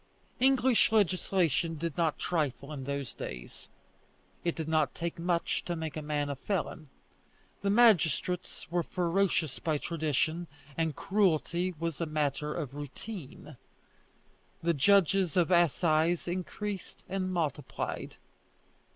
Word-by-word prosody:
English 260 -3 +4
legislation 180 -5 +2
did 165 -1 -3
not 165 -3 +1
trifle 150 -3 -2
in 135 -3 -6
those 140 -2 -3
days. - - -8 0.7
It 170 - 0
did 160 -2 -4
not 155 -5 +1
take 170 -1 -4
much 170 0 0
to 175 - -2
make 160 -2 -4
a 155 - -3
man 150 -1 -1
a 140 - -3
felon. 155 -2 -3 0.7
The 200 - 0
magistrates 180 - +3
were 175 0 +2
ferocious 175 -4 0
by 155 -2 0
tradition, 160 +2 -1 0.3
and 160 -3 0
cruelty 185 -2 +1
was 165 -2 -3
a 165 - 0
matter 150 -1 -1
of 150 -5 -4
routine. 145 - -8 1.1
The 170 0 +3
judges 190 +2 +4
of 175 0 +3
assize 170 0 +3
increased 185 +3 -4
and 185 -1 -2
multiplied. 165 -6 -3
165 Hz, 125 wpm, -30 LUFS, 150-185 Hz, 1.1 s, English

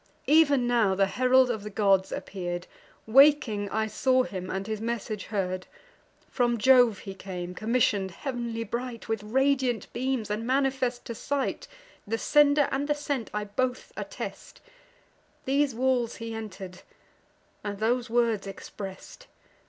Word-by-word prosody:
Ev'n 285 -4 +5
now 230 -5 +2
the 195 +1 +3
herald 255 +4 +3
of 220 -3 -3
the 210 - -6
gods 195 -2 +2
appear'd: 175 -2 -4 0.4
Waking 235 -5 +5
I 220 +2 0
saw 255 +4 +2
him, 185 -5 -6
and 195 +1 -3
his 215 0 -4
message 225 -3 -3
heard. 185 -3 -3 0.6
From 240 -2 +1
Jove 245 -2 +5
he 195 0 -8
came 180 -2 -6
commission'd, 215 -2 +1
heav'nly 235 +2 -4
bright 235 +1 -5
With 225 -2 -1
radiant 255 0 0
beams, 255 -4 -2
and 210 +2 -2
manifest 260 -2 0
to 235 - -5
sight 275 +4 -2 0.4
(The 225 +2 -1
sender 290 +2 +4
and 275 +2 -1
the 295 - +1
sent 285 -5 -3
I 210 0 -2
both 250 +5 -3
attest) - - -7 0.9
These 275 -1 +1
walls 250 -1 +1
he 230 0 -6
enter'd, 195 -4 -8 0.8
and 205 -1 -4
those 240 +3 0
words 230 -4 +1
express'd. 195 - -9
230 Hz, 140 wpm, -27 LUFS, 205-260 Hz, 0.9 s, Ev'n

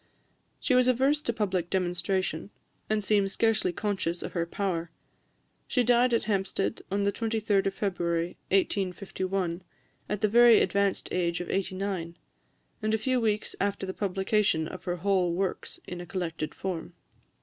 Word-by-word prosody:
She 260 - +1
was 250 0 +5
averse 265 +4 +3
to 235 - -1
public 190 -6 -1
demonstration, 180 -1 -1 0.4
and 215 -1 +1
seemed 200 0 +3
scarcely 225 -2 +2
conscious 190 -3 -2
of - - -6
her 170 -1 -1
power. 170 -3 -2 0.8
She 250 - +2
died 245 +1 +4
at 230 - +2
Hampstead, 195 0 -1
on 200 +1 0
the 200 - +2
23d 215 -2 0
of 195 - -1
February 170 -4 0 0.2
1851, 190 -2 0 0.5
at 210 -1 -2
the 215 - +4
very 235 +1 +7
advanced 200 -1 +1
age 175 -1 0
of 175 - -4
eighty 190 0 -1
nine, 185 -4 -3 0.6
and 215 0 +1
a - - +1
few 255 +3 0
weeks 215 -1 0
after 200 -1 0
the 190 - -4
publication 195 -4 +1
of 185 - -9
her 175 - -1
whole 180 -1 +1
Works 190 0 -3
in 180 0 -6
a 175 - -9
collected 165 -4 -3
form. 180 -2 -4
195 Hz, 160 wpm, -28 LUFS, 180-215 Hz, 0.8 s, very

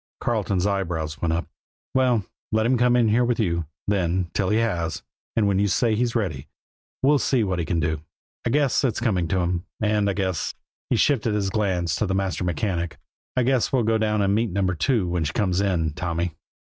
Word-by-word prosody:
Carleton's 100 -5 0
eyebrows 85 -6 -2
went 85 - +1
up. 85 +2 -1 0.5
"Well, 125 -6 +2 0.3
let 110 0 +2
him 130 +2 +3
come 125 0 +3
in 120 -3 +4
here 115 +3 +3
with 120 -1 0
you, 85 -6 0 0.2
then, 90 -3 0
till 100 -3 0
he 105 - +3
has; 85 -9 -1 0.3
and 110 -3 +3
when 100 -1 +2
you 100 - +3
say 115 +3 +2
he's 120 +2 0
ready, 85 - -2 0.6
we'll 145 +1 +5
see 115 +2 +2
what 95 -3 -1
we 85 - -1
can 85 0 0
do. 80 -1 -1 0.4
I - - 0
guess 140 -1 +2
it's 125 -5 +1
coming 95 -8 +1
to 95 +3 +1
him; 85 0 -1 0.2
and 105 -1 +2
I - - +1
guess" 95 -3 -2 0.3
he - - +3
shifted 115 -6 +2
his 100 -2 0
glance 95 -5 0
to 105 - 0
the 95 - 0
master 95 -3 -1
mechanic 90 -2 -2 0.4
"I 125 - +4
guess 130 -1 +2
we'll 130 -4 +2
go 110 0 +2
down 105 -1 +1
and 100 0 +2
meet 110 +2 +1
Number 95 0 0
Two 105 - +1
when 85 -1 0
she 75 0 -2
comes 95 -2 +1
in, 85 -6 0
Tommy." 85 0 -2
100 Hz, 210 wpm, -24 LUFS, 85-115 Hz, 0.6 s, we'll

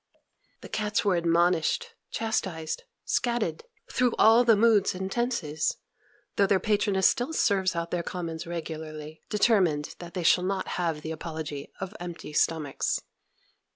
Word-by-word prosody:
The - - -9
cats 210 -1 -1
were 195 -3 +3
admonished, 170 - +2 0.2
chastised, 185 -8 -2 0.2
"scat" 240 -2 +1
ed, 455 - -4 0.3
through 250 -2 +2
all 225 +2 +7
the 230 -2 +6
moods 210 -3 +4
and 190 +1 -4
tenses; 190 -12 -1 0.6
though 200 - +4
their 195 -1 +3
patroness 200 -2 +2
still 245 +6 0
serves 190 - +2
out 170 0 -3
their 175 - 0
commons 170 -2 -5
regularly, 155 -2 -6
determined 190 -9 +2
that 175 0 -9
they 180 - -2
shall 180 +2 +5
not 190 0 -2
have 165 -4 -1
the 160 - -4
apology 155 -3 -6
of 190 +1 -5
empty 175 -3 -7
stomachs. 150 -2 0
180 Hz, 145 wpm, -27 LUFS, 160-210 Hz, 0.6 s, all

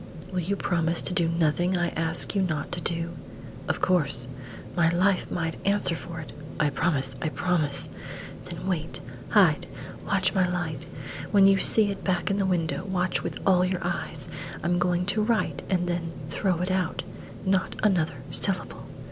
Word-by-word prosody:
"Will 185 - -1
you 185 +4 -1
promise 170 -3 0
to - - -1
do 175 -3 +2
nothing 170 +2 +1
I 175 0 +1
ask 165 +1 0
you 200 - +1
not 155 -5 -2
to 175 -1 -3
do?" 165 +1 -1 0.6
"Of - - -1
course." 140 -9 +3 0.5
"My 170 -2 +4
life 185 +3 +1
might 165 -2 -3
answer 200 -3 +2
for 165 0 -7
it 155 - -8 0.2
" - - -12
"I 150 -2 +2
promise 135 -3 0
I 155 - 0
promise." 155 -4 0 0.6
"Then - - -7
wait 165 -4 -2 0.3
hide 175 -8 +4 0.4
watch - - +2
my 185 -1 +2
light. 165 -4 -3 0.4
When 195 -1 +6
you 195 0 +5
see 210 +1 +6
it 195 - -7
back 185 0 0
in 200 - 0
the 195 - +1
window, 165 -2 0
watch 185 -2 0
with - - -4
all 185 -2 +4
your 185 0 -1
eyes! 175 0 -3 0.4
I - - -5
am 175 +1 +2
going 180 0 +1
to 200 +3 +1
write 220 +1 0
and 180 -2 +1
then 170 -1 -2 0.2
throw 180 -1 0
it 185 +1 -1
out. 185 -2 -1 0.4
Not 190 -1 +1
another 160 -9 +1
syllable!" 185 +4 +3
175 Hz, 180 wpm, -26 LUFS, 165-190 Hz, 0.6 s, When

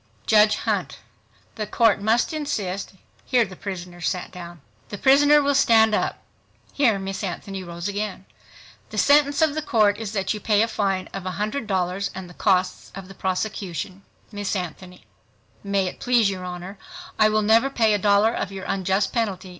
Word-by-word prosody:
JUDGE 215 -1 +5
HUNT—The 215 -2 -6
Court 215 -1 +3
must 225 +8 +1
insist 205 -13 -3 0.3
(here 245 -3 +2
the 190 -2 -11
prisoner 180 -2 -7
sat 180 +2 -2
down). 175 -3 -10 0.3
The 205 - -6
prisoner 290 +4 +5
will 285 0 +2
stand 225 -5 +4
up. - - -1 0.5
(Here 240 -8 +3
Miss 195 +1 -5
Anthony 190 +1 -5
rose 170 +1 -6
again.) 205 -2 -4 0.6
The - - -8
sentence 285 +1 +4
of 310 -2 +2
the 310 - -2
Court 215 -7 +2
is 220 -2 -5
that 195 -1 -1
you 210 - -5
pay 210 +1 +2
a - - 0
fine 195 -4 -1
of 195 - -4
$100.00 195 -1 -2
and 190 -1 -7
the 175 - -13
costs 185 -1 0
of 195 -1 -9
the - - -10
prosecution. 190 -1 -4 0.3
Miss 205 -1 -3
ANTHONY—May 185 +2 -6
it 180 - -6
please 240 -5 +3
your 185 -1 -6
Honor, 180 +2 -7 0.4
I 215 0 +6
will 215 0 +1
never 225 +5 +4
pay 225 -5 +2
a 205 - +1
dollar 205 +3 +3
of 200 - -3
your 195 -1 -7
unjust 190 +1 0
penalty 200 -6 -2
200 Hz, 170 wpm, -23 LUFS, 185-225 Hz, 0.6 s, I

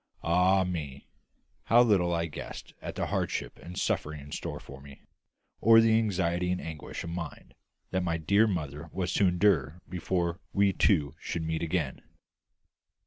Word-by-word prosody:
Ah 90 +3 +4
me! 75 -7 -5 0.6
how 120 +2 +6
little 95 -7 +3
I 85 -1 0
guessed 75 - -8
at - - -6
the - - -1
hardship - - -2
and 90 +1 -9
suffering 75 0 -1
in 70 +1 -11
store - - -4
for 65 0 -12
me, 70 -1 -14 0.6
or 115 +1 +7
the 115 -1 +5
anxiety 90 -4 0
and 90 - -1
anguish 80 -2 -6
of 85 - -5
mind 85 -2 -7 0.4
that 95 - +1
my 85 -2 0
dear 100 +8 +3
mother 80 -4 -4
was 95 -1 -2
to 100 - +4
endure 90 -5 +2
before 90 0 -1
we 100 -1 +3
two 75 -11 +2
should 85 - -3
meet 80 0 -2
again! 80 -5 -1
85 Hz, 160 wpm, -29 LUFS, 80-95 Hz, 0.6 s, or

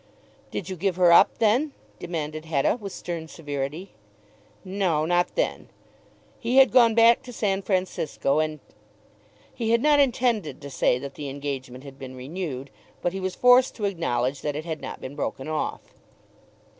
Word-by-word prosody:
"Did 185 - -5
you 190 - -4
give 185 +1 -1
her 180 -1 +5
up 170 - +6
then?" 245 +7 +2 0.3
demanded 155 -2 -4
Hetta 155 +1 +1
with 200 -1 -6
stern 170 -3 -5
severity. 150 +3 -5 0.7
No, 185 -5 0
not 175 +1 +1
then. - - -1 0.7
He 245 +2 0
had 270 -2 +7
gone 235 -3 +5
back 230 0 +6
to 250 - -10
San 200 -4 -1
Francisco, 180 -7 0
and, 155 -1 -1 0.9
he 225 -2 -2
had 230 0 +4
not 295 -1 +5
intended 240 - +1
to 140 -1 -9
say 125 - +2
that 140 +2 -7
the 145 -2 -6
engagement 135 -2 -6
had 140 -1 -12
been 130 -1 -8
renewed, 140 0 -6 0.3
but 175 - 0
he 195 - -3
was 185 -1 -3
forced 250 +1 +5
to 210 - -3
acknowledge 140 -8 -1
that 145 -1 -2
it 155 +2 -5
had 160 -2 -4
not - - -7
been 130 +2 -7
broken 135 -2 -4
off. 155 -1 -4
170 Hz, 170 wpm, -25 LUFS, 145-210 Hz, 0.9 s, had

